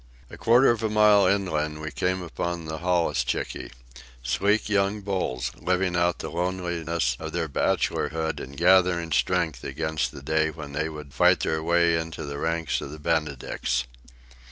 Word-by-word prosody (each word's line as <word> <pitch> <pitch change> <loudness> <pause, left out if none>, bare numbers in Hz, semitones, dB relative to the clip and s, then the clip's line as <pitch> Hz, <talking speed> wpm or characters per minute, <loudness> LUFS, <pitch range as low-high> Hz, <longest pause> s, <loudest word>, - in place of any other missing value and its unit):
A - - -8
quarter 120 +3 +5
of 115 -1 -2
a 110 - 0
mile 105 -2 +5
inland 80 -6 0
we 80 0 -5
came 90 +7 -1
upon 85 0 -4
the 80 0 -5
holluschickie—sleek 65 - -1
young 100 0 +1
bulls, 75 -11 -2
living 90 0 0
out 85 0 +2
the - - -6
loneliness 85 -6 -1
of - - -6
their - - -1
bachelorhood 80 0 -1
and 70 +2 -9
gathering 90 -1 +4
strength - - 0
against 80 +1 -2
the 70 - -11
day 80 +2 +1
when 75 -3 -8
they 75 +2 -1
would 75 -3 -9
fight - - +4
their 80 0 0
way 85 +1 +3
into 80 -1 -6
the 70 0 -5
ranks 80 -1 -1
of - - -6
the 75 - -8
Benedicts. 75 -5 -1
80 Hz, 155 wpm, -25 LUFS, 75-90 Hz, -, quarter